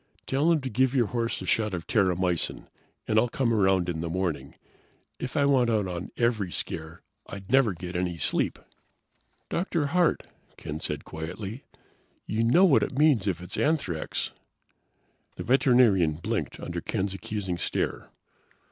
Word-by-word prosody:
Tell 145 +5 +2
him 160 -3 +2
to 130 - -4
give 130 +4 +2
your 120 -3 +4
horse 115 +2 -2
a - - -6
shot 105 -4 +1
of 85 - -6
terramycin, 90 -4 0 0.4
and 110 0 +4
I'll 120 +2 +2
come 120 -1 0
around 95 -4 +3
in 85 -2 -2
the 85 - -3
morning. 90 -2 -3 0.6
If 125 +4 -4
I 140 - +4
went 130 -4 +3
out 110 -3 +1
on 90 -1 -5
every 110 -6 +1
scare, 80 0 -5 0.2
I'd 100 +1 -9
never 130 -6 +4
get 90 +1 -7
any 90 -1 -1
sleep." - - +1 0.9
"Dr. 170 -3 -1
Hart," 180 -2 +3 0.3
Ken 75 +1 -6
said 75 -2 -4
quietly. 95 - -6 0.6
"You 110 +2 0
know 150 +12 +5
what 160 -8 +5
it 135 - -2
means 140 -9 +4
if 90 -3 -1
it 90 - -10
is - - -2
anthrax." 140 - -1 1.0
The - - -5
veterinarian 120 - +4
blinked 80 +2 -3
under - - -5
Ken's 95 0 -2
accusing 95 -3 -4
stare. - - -2
105 Hz, 160 wpm, -27 LUFS, 90-130 Hz, 1.0 s, know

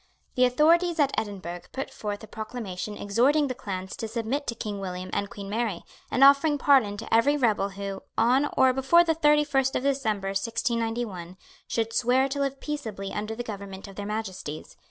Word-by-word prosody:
The 255 - +4
authorities 330 +6 +3
at 280 -2 +3
Edinburgh 185 -5 -4
put 270 - -4
forth 205 0 -5
a - - -9
proclamation 210 -2 -6
exhorting 255 +9 +2
the 255 - -2
clans 190 -6 -6
to 225 - -4
submit 235 +6 -3
to 235 - -2
King 205 -3 -5
William 185 -1 -5
and 200 - -1
Queen 200 -1 -8
Mary, 215 -3 -2 0.3
and 260 - +3
offering 280 +2 +6
pardon 260 -8 +4
to 225 - -6
every 280 +6 +4
rebel 215 -6 +2
who, 195 0 -6 0.2
on 255 +6 +3
or 260 -1 +5
before 270 +7 +5
the 330 -1 +2
thirty 300 -1 +4
first 270 -2 +1
of - - 0
December 220 -8 0
1691, 225 -3 -2 0.3
should 225 0 -1
swear 250 +3 +3
to 280 +1 -3
live 275 -1 -1
peaceably 220 -10 -5
under 215 +1 -3
the 240 - -4
government 200 -3 -7
of 195 - -12
their 205 +1 -5
Majesties. 190 -8 -5
225 Hz, 185 wpm, -26 LUFS, 200-270 Hz, 0.3 s, offering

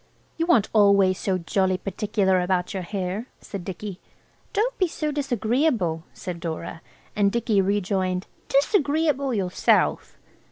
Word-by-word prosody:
"You 330 0 -1
aren't 235 - +4
always 200 -3 +4
so 190 -2 0
jolly 185 +1 0
particular 190 -1 0
about 180 0 0
your 190 - -3
hair," 190 +4 -4
said 195 -3 -7
Dicky. 190 +1 -6 0.5
"Don't 465 +5 0
be 370 - +3
so 305 -2 -3
disagreeable," 240 - 0
said 175 -2 -6
Dora. 165 0 -5 0.3
And 200 -1 +3
Dicky 225 -3 +2
rejoined, 190 -1 0 0.2
"Disagreeable 285 - +2
yourself!" 190 -6 +1
200 Hz, 125 wpm, -24 LUFS, 185-255 Hz, 0.5 s, aren't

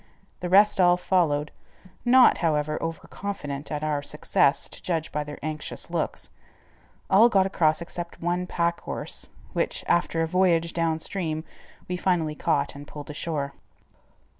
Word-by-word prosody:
The 180 - -3
rest 205 +2 +5
all 175 0 +5
followed, 155 -5 +1 0.5
not, 255 +1 +6
however, 155 -2 0
over 165 -1 -4
confident 145 -8 -5
at 150 0 -3
our 150 -2 0
success, 145 0 +2
to - - -8
judge 165 -3 -2
by 150 - -1
their 150 0 -8
anxious 155 0 -5
looks. - - -3 0.8
All 220 +5 +6
got 195 -4 +4
across 170 -4 +2
except 170 0 -7
one 175 +1 -1
pack 170 -1 0
horse, - - -6 0.2
which, - - -1
after 165 -1 +2
a - - 0
voyage 170 -2 +2
down 165 -2 +1
stream, 160 -2 -3 0.4
we 180 - -2
finally 175 -4 +1
caught - - 0
and 145 +1 -10
pulled 145 0 -8
ashore. 145 -2 -3
165 Hz, 150 wpm, -26 LUFS, 150-180 Hz, 0.8 s, not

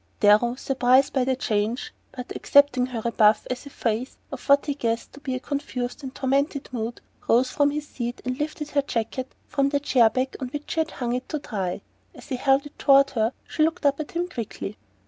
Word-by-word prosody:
Darrow, 215 +4 +5
surprised 260 +1 +3
by 265 - +2
the 260 +1 +1
change, 225 0 -1 0.2
but 250 -2 -7
accepting 280 -3 +4
her 240 -3 -4
rebuff 215 -2 +3
as 255 +3 -5
a - - -8
phase 235 0 -2
of 270 -1 -8
what 280 0 +6
he 290 - 0
guessed 230 -4 -2
to 280 - -12
be 265 -3 -3
a - - -3
confused 255 -2 -4
and 265 -1 -7
tormented 280 +2 0
mood, 235 -1 -4 0.3
rose 250 +2 +4
from 285 0 +3
his 295 +1 -4
seat 240 -1 -5
and 255 +1 -2
lifted 300 0 -4
her 285 - +3
jacket 255 0 -3
from 275 -1 +1
the 285 0 +1
chair 250 -5 +4
back 260 +3 -2
on 260 - -3
which 290 +3 -6
she - - -1
had 320 0 +1
hung 245 -5 -3
it 250 +1 -4
to 305 - -1
dry. 195 -10 -3 0.3
As - - -13
he 260 - -1
held 270 +2 +3
it 290 - -13
toward 275 0 +5
her 225 -2 +1 0.2
she - - -3
looked 320 0 +1
up 280 0 +3
at 305 - -5
him 345 +1 -1
quickly. 230 - -6
260 Hz, 220 wpm, -25 LUFS, 240-285 Hz, 0.3 s, what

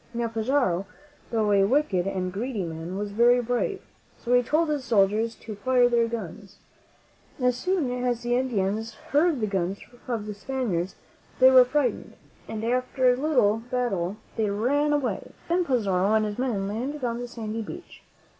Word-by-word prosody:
Now, 235 -1 -1
Pizarro, 225 -5 0 0.4
though 220 -3 +1
a 200 -1 +5
wicked 200 -6 +1
and 185 -2 -2
greedy 220 0 -3
man, 165 +2 -5
was 205 0 -3
very 240 +4 +4
brave; 245 - -1 0.4
so 245 - -2
he 245 - +6
told 305 +6 +1
his 295 -3 -1
soldiers 220 0 +2
to 220 - -9
fire 250 +3 +3
their 235 -1 +2
guns. 205 -4 -7 0.8
As 250 -1 +2
soon 325 -1 0
as 245 -1 -1
the 240 0 0
In 260 +1 +1
dians 215 +1 -1
heard 300 +1 +1
the 215 - 0
guns 195 -1 -1 0.3
of 230 -4 -2
the 210 - -5
Spaniards 205 -6 -3 0.4
they 260 0 +7
were 255 -1 +8
frightened, 275 +1 -1 0.3
and 220 0 -5
after 255 +1 +2
a - - -1
little 250 -7 +2
battle 210 -7 -1 0.2
they 215 -2 +1
ran 270 +9 +1
away. 260 -9 -2
Then 350 +1 +1
Pizarro 205 - +1
and 215 0 +2
his 210 +2 -4
men 220 -7 -1
landed 255 +8 -4
on 235 -1 -1
the 245 - -5
sandy 225 -2 -5
beach. 215 - -9
235 Hz, 175 wpm, -26 LUFS, 205-255 Hz, 0.8 s, were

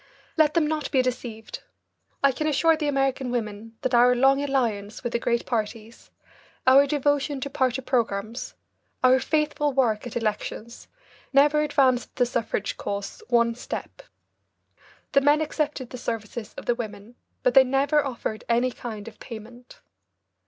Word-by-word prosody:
Let 310 -1 +3
them 330 -2 +3
not 305 -2 -2
be 260 -2 +2
deceived. 235 -3 -5 0.6
I 275 - +6
can 305 +4 -2
assure 325 +2 +3
the 305 -1 -2
American 270 -2 0
women 225 -1 -4
that 260 -1 -1
our 245 +1 +6
long 270 +2 +4
alliance 230 -7 -1
with 240 - -3
the 235 - +1
great 235 0 0
parties, 225 -1 -4 0.6
our 275 +2 +7
devotion 290 0 0
to 280 - -4
party 260 -2 0
programmes, 230 -2 -2 0.5
our 255 +1 +6
faithful 300 -1 0
work 240 -4 +1
at 240 - -4
elections, 220 +1 -4 0.5
never 295 +2 +5
advanced 275 -4 +1
the 250 - +3
suffrage 230 -3 -2
cause 200 0 -5
one 235 -1 +3
step. 245 - -7 1.1
The 275 - +4
men 290 +2 +4
accepted 300 -4 -2
the 250 - -7
services 225 -1 -5
of - - -9
the 240 - +2
women, 215 -1 -7 0.3
but 250 - +3
they 270 - +8
never 275 +3 +2
offered 235 -5 -4
any 240 +2 +2
kind 220 -4 -7
of 220 - -11
payment. 235 +2 -11
250 Hz, 150 wpm, -25 LUFS, 230-280 Hz, 1.1 s, they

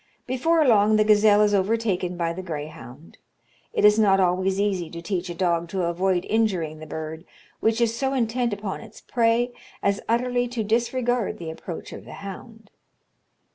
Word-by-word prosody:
Before 310 +6 +2
long 215 -3 +5
the 215 - +4
gazelle 210 -1 +5
is 205 0 +2
overtaken 195 -3 0
by 170 -1 -1
the 185 - -6
greyhound. 155 -3 -8 0.5
It - - +2
is 210 +1 +6
not 195 -3 +4
always 190 +1 +1
easy 190 -5 0
to 170 - -8
teach 180 0 -3
a 175 - -5
dog 170 -1 0
to 185 0 -2
avoid 180 +1 0
injuring 185 -9 0
the 155 - -9
bird, 160 +1 -6 0.4
which 225 +1 +1
is 230 -1 +1
so 265 +2 -1
intent 240 0 0
upon 200 -1 -4
its 225 - -13
prey 235 +1 +1 0.3
as 200 0 +1
utterly 245 +1 +1
to 240 -2 -3
disregard 240 +1 0
the 165 -2 -6
approach 165 +1 -8
of - - -10
the - - -10
hound. 220 +2 -10
205 Hz, 175 wpm, -24 LUFS, 175-230 Hz, 0.5 s, is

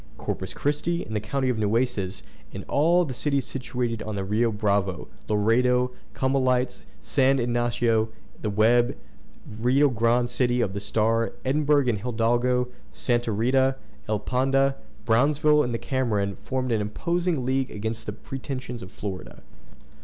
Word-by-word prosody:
Corpus - - -4
Christi, 165 +4 -1
in 110 - -8
the 105 - +1
county 130 +6 -2
of 120 -3 0
Nueces, 105 -3 0 0.3
and - - -6
all 170 +4 +3
the 135 - -5
cities 140 0 0
situated 125 -3 -3
on 110 -1 -4
the 100 - -2
Rio 110 +4 +1
Bravo, 100 -3 0 0.2
Laredo, 125 +4 +3 0.2
Comalites, 130 - +1 0.2
San 135 0 +2
Ignacio 120 -2 +1
on - - -14 0.3
the 105 - -1
Web, 115 +4 +3 0.6
Rio 135 +5 +4
Grande 120 0 +2
City 120 0 +1
on 95 - -2
the 100 - -4
Starr, 115 +2 +1
Edinburgh 145 +1 +3
in 120 - +2
the - - -9
Hidalgo, 120 +2 +1 0.2
Santa 120 -2 0
Rita, 130 +5 +2 0.3
Elpanda, 135 +5 +1 0.3
Brownsville 150 +6 +4
in 125 - -1
the 115 - -1
Cameron, 110 -6 -1
formed 130 -1 -3
an 110 -2 +1
imposing 170 - -1
league 130 0 0
against 110 +2 -5
the - - -1
pretensions 130 0 -6
of 95 - -9
Florida. 95 -3 -7
120 Hz, 145 wpm, -25 LUFS, 110-130 Hz, 0.6 s, Rio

